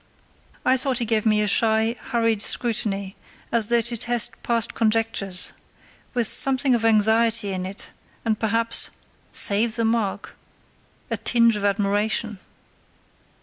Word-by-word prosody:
I 260 - +3
thought 260 -1 +1
he 235 - 0
gave 220 0 0
me 210 -1 +2
a - - -1
shy, 220 +2 +2
hurried 230 -3 0
scrutiny 205 -4 -1 0.4
as 230 -2 +2
though 235 0 +2
to 235 +1 -3
test 240 0 -1
past 230 -2 -2
conjectures, 215 -4 0 0.6
with 240 -2 +1
something 265 +3 +3
of 235 -2 0
anxiety 220 -1 +2
in 185 0 -4
it, 195 +1 -8 0.4
and 220 -1 -1
perhaps 230 +1 +1 0.4
(save 220 +3 +2
the 230 -1 -1
mark!) 225 -3 -2 0.8
a - - -1
tinge 235 -2 +2
of 205 - -4
admiration. 205 +1 -1
225 Hz, 135 wpm, -22 LUFS, 210-235 Hz, 0.8 s, I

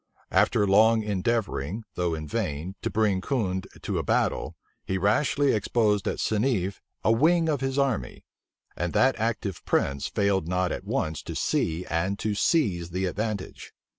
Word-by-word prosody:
After 105 - +3
long 110 +3 +5
endeavoring, 105 - -1
though 85 -2 -1
in 80 -1 -6
vain, 75 +5 -3
to - - -1
bring 105 -3 +1
Condé 95 -7 -2
to - - -1
a - - -2
battle, - - 0 0.3
he 95 - -2
rashly 135 +8 +2
exposed 105 -1 +1
at - - -1
Seneffe 105 -4 0 0.2
a 110 - +4
wing 165 +8 +3
of 145 -4 0
his 135 0 -1
army; 130 - -1 0.5
and 85 +1 -2
that 130 +1 +4
active 110 -5 -2
prince 70 0 0
failed 100 -4 0
not 90 0 0
at - - -5
once 80 -1 -2
to - - -7
see 85 +2 0
and 90 +4 -1
to 110 0 -1
seize 100 - +1
the 90 +2 -2
advantage. 105 +1 -4
100 Hz, 160 wpm, -26 LUFS, 90-115 Hz, 0.5 s, long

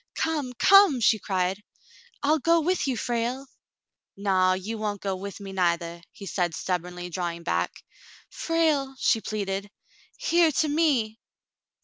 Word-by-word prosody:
"Come, 300 -6 -1
come!" 390 - +6
she 220 -1 +3
cried. 190 0 -1 0.6
"I'll 305 +2 +3
go 335 +4 +3
with 360 -2 0
you, 260 -3 -1
Frale." 240 +4 -2 0.7
"Naw, 190 -2 +2
you 205 +4 -4
won't 210 -1 -2
go 195 -1 -2
with 200 +2 -7
me 195 -1 -8
neithah," 170 -2 -1
he 200 - -11
said 175 -3 -1
stub 180 -2 -1
bornly, 180 0 -8
drawing 170 -1 -4
back. - - -2 0.5
"Frale 310 -5 0
!" - - -25
she 225 - +2
pleaded. 200 -2 -3 0.5
"Hear 340 -9 +3
to 310 - +1
me." 280 -8 +1
215 Hz, 145 wpm, -26 LUFS, 185-285 Hz, 0.7 s, come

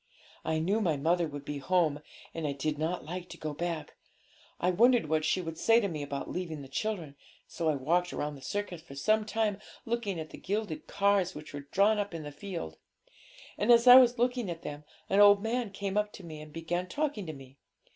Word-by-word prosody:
I 160 - 0
knew 195 +8 +1
my 165 -7 +1
mother 170 +4 +1
would 145 -1 -8
be 145 -1 -4
home, 155 -1 +1 0.3
and 165 -2 -3
I 140 - -1
did 150 +2 -2
not 165 +2 -2
like 180 +2 -6
to - - -9
go 155 -1 -4
back; 170 +1 -4 0.7
I 180 - +2
wondered 235 -1 +4
what 155 0 +1
she 170 +4 +1
would 165 -2 -6
say 230 0 +5
to 210 - 0
me 155 -5 -4
about 140 -1 -4
leaving 165 -5 -4
the - - -10
children. 165 -1 -3 0.3
So 165 -2 -2
I 155 - +2
walked 175 +6 +1
round 150 0 -3
the 135 - -12
circus 200 0 -4
for 155 -4 -12
some 215 +9 +2
time, 215 -2 0 0.3
looking 225 -6 -2
at 155 -1 -7
the - - -10
gilded 215 +9 -3
cars, 200 -2 +2
which 150 0 -9
were 145 -1 -7
drawn 210 +2 +4
up 200 -4 -3
in 160 - -5
the 145 - -7
field. 150 - -6 0.8
And 215 +4 +4
as 235 0 +6
I 250 0 +11
was 245 -1 +6
looking 245 -3 0
at 170 -1 -6
them, 145 0 -7 0.2
an 195 - +2
old 205 0 +7
man 235 0 -1
came 195 0 -4
up 210 0 +1
to 195 - -11
me 155 -3 -8
and 155 0 -11
began 175 +3 -3
talking 275 - -2
to 155 - -4
me. 135 -1 -14
175 Hz, 225 wpm, -30 LUFS, 155-205 Hz, 0.8 s, I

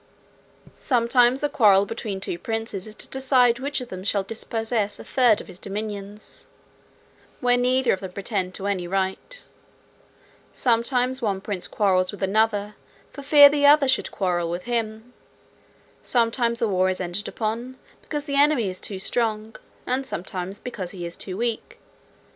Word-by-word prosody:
"Sometimes 245 0 +3
the 295 - +2
quarrel 205 -8 +5
between 210 -2 -5
two 175 -2 -4
princes 225 -2 -4
is 215 - -10
to - - -3
decide 255 -3 +3
which 280 0 -2
of 250 - -8
them 185 0 -7
shall 200 0 0
dispossess 225 0 -2
a - - -10
third 245 -5 +3
of - - -9
his 180 - -10
dominions, 205 0 -7 0.9
where 245 -1 +3
neither 250 +1 +2
of 190 - -3
them 190 -1 -7
pretend 190 -1 -3
to 195 - -6
any 190 -3 -1
right. 195 - -2 1.1
Sometimes 250 +2 +1
one 200 -4 -1
prince 190 -2 -4
quarrels 185 -3 +1
with 205 -1 -7
another 210 +1 +1 0.4
for 280 - -8
fear 285 +1 +8
the 285 0 +3
other 290 -1 +6
should 260 -1 +1
quarrel 175 -3 -1
with 175 +1 -4
him. 230 0 -3 0.9
Sometimes 235 -1 +1
a - - +3
war 185 -2 +2
is 185 - -2
entered 180 +2 -2
upon, 235 +4 -4 0.2
because 295 -1 -5
the 280 -1 +2
enemy 285 -9 +3
is 185 - -8
too 200 - -5
strong; 220 +2 -2 0.3
and 260 +2 -1
sometimes, 185 -1 -5
because 205 -8 -6
he 180 -2 -7
is 170 - -6
too 185 -1 -5
weak. 230 0 -3
220 Hz, 160 wpm, -24 LUFS, 195-245 Hz, 1.1 s, fear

